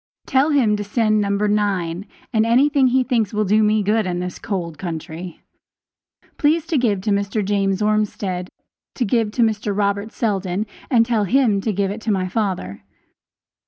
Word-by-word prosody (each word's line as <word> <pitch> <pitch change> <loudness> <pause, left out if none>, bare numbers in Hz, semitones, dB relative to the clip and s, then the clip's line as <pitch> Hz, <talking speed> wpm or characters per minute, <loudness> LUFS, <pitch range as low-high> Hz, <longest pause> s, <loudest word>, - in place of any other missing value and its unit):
Tell 270 +3 +2
him 250 -8 +3
to 205 - -3
send 215 0 +1
No. 200 - -1
9, 200 -3 0 0.3
and 220 -1 +3
anything 265 +4 +3
he 255 +1 +3
thinks 230 -5 0
will 215 0 +1
do 210 +3 +3
me 215 0 +2
good 210 0 +1
in 175 -1 -2
this 180 0 -5
cold 170 -6 -4
country. 165 0 -6 1.0
Please 310 +2 +2
to 330 -2 0
give 210 -6 +1
to 210 - -1
Mr. 200 +1 0
James 195 0 0
Ormsted 205 -4 -1 0.5
to 245 - 0
give 225 0 +1
to 240 - +2
Mr. 210 -2 -1
Robert 200 +1 0
Seldon, 195 -3 -1 0.2
and 230 -4 +4
tell 225 -3 +1
him 225 -3 +2
to 220 - -1
give 195 0 -1
it 215 +2 -6
to 220 - -1
my 185 -2 0
father. 185 - -3
210 Hz, 175 wpm, -20 LUFS, 195-225 Hz, 1.0 s, and